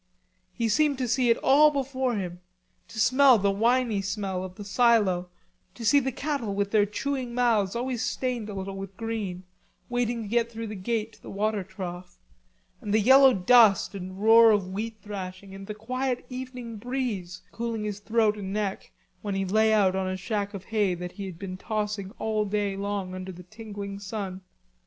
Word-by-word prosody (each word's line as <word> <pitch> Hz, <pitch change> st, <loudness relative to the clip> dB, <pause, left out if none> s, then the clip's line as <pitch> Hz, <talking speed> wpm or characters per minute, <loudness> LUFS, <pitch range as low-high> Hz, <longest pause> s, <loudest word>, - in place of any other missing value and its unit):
He 230 Hz, +4 st, -1 dB
seemed 285 Hz, +5 st, +2 dB
to 255 Hz, -1 st, -1 dB
see 245 Hz, +1 st, +2 dB
it 230 Hz, -, +4 dB
all 295 Hz, +3 st, +6 dB
before 265 Hz, -3 st, -1 dB
him, 180 Hz, -3 st, -4 dB, 0.5 s
to 220 Hz, -, -8 dB
smell 260 Hz, +3 st, +6 dB
the 200 Hz, -1 st, +2 dB
winey 230 Hz, 0 st, +2 dB
smell 195 Hz, -2 st, -3 dB
of 185 Hz, -1 st, -8 dB
the 205 Hz, -, -8 dB
silo, 200 Hz, -5 st, +3 dB, 0.5 s
to 235 Hz, -, -7 dB
see 285 Hz, +7 st, +6 dB
the 265 Hz, -1 st, -2 dB
cattle, 275 Hz, -7 st, -3 dB
with 200 Hz, 0 st, -1 dB
their 210 Hz, -2 st, +4 dB
chewing 255 Hz, +2 st, -3 dB
mouths 230 Hz, -5 st, +2 dB
always 245 Hz, 0 st, -2 dB
stained 240 Hz, -1 st, -2 dB
a 205 Hz, -, -6 dB
little 195 Hz, 0 st, -5 dB
with 195 Hz, 0 st, -8 dB
green, 215 Hz, -6 st, -4 dB, 0.5 s
waiting 240 Hz, -1 st, -1 dB
to -, -, -7 dB
get 235 Hz, +2 st, +1 dB
through 225 Hz, 0 st, -5 dB
the 215 Hz, -, -6 dB
gate 220 Hz, +3 st, -2 dB
to -, -, -20 dB
the -, -, -10 dB
water 210 Hz, 0 st, -1 dB
trough, 180 Hz, -2 st, -8 dB, 0.6 s
and 205 Hz, 0 st, -1 dB
the -, -, +5 dB
yellow 265 Hz, +4 st, +7 dB
dust 210 Hz, 0 st, +5 dB
and 185 Hz, -1 st, -7 dB
roar 225 Hz, +2 st, +7 dB
of 200 Hz, -4 st, +1 dB
wheat 220 Hz, +2 st, -4 dB
thrashing, 190 Hz, -1 st, -7 dB
and 195 Hz, 0 st, -9 dB
the 210 Hz, -, -5 dB
quiet 250 Hz, +3 st, -2 dB
evening 250 Hz, -3 st, -7 dB
breeze 210 Hz, -7 st, -4 dB
cooling 230 Hz, -2 st, -3 dB
his 210 Hz, -1 st, -4 dB
throat 215 Hz, 0 st, +1 dB
and 190 Hz, -1 st, -5 dB
neck 205 Hz, -1 st, -3 dB, 0.3 s
when 205 Hz, -2 st, -3 dB
he 195 Hz, 0 st, 0 dB
lay 220 Hz, +3 st, +3 dB
out 200 Hz, -3 st, +3 dB
on 190 Hz, -1 st, -1 dB
a 185 Hz, 0 st, -2 dB
shack 205 Hz, +2 st, -3 dB
of 190 Hz, -, -7 dB
hay 205 Hz, -5 st, +1 dB
that 180 Hz, 0 st, -6 dB
he 200 Hz, 0 st, -7 dB
had 180 Hz, -3 st, -8 dB
been 185 Hz, 0 st, -6 dB
tossing 210 Hz, -1 st, -3 dB
all 215 Hz, -1 st, 0 dB
day 205 Hz, -1 st, -1 dB
long 200 Hz, -2 st, -3 dB
under 185 Hz, 0 st, -6 dB
the 180 Hz, 0 st, -11 dB
tingling 205 Hz, 0 st, -8 dB
sun. 195 Hz, -2 st, -5 dB
210 Hz, 195 wpm, -27 LUFS, 195-235 Hz, 0.6 s, yellow